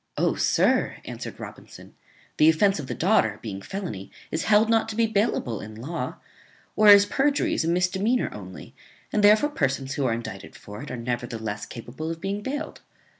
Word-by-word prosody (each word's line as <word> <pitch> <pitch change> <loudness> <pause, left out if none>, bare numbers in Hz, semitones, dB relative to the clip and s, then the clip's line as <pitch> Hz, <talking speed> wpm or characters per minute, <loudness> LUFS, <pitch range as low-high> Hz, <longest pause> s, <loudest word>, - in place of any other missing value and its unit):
"Oh! - - +2
sir," - - +2
answered - - -7
Robinson, - - -11 0.4
"the 155 - +6
offence 195 +3 +3
of 140 - -6
the - - -4
daughter, 160 - +2
being 100 -4 -5
felony, 165 - -6 0.2
is 160 - -2
held 215 +1 +4
not 225 -1 +2
to 215 - -5
be 230 0 +3
bailable 200 - 0
in 110 +1 -9
law; 140 +10 -5 0.6
whereas 205 -1 +8
perjury 280 +5 +1
is - - 0
a - - -2
misdemeanor 190 +7 +1
only; 95 -3 -10 0.4
and 210 - +1
therefore 215 +8 +6
persons 135 - -1
who 140 - -1
are - - +2
even 115 +1 -1
indicted 95 -3 -9
for 105 +3 -10
it 145 - -8
are, 125 - -5
nevertheless, 115 -3 -4
capable 130 +7 -7
of 165 0 -5
being 195 +3 -3
bailed. 290 +6 -5
165 Hz, 180 wpm, -25 LUFS, -, 0.6 s, whereas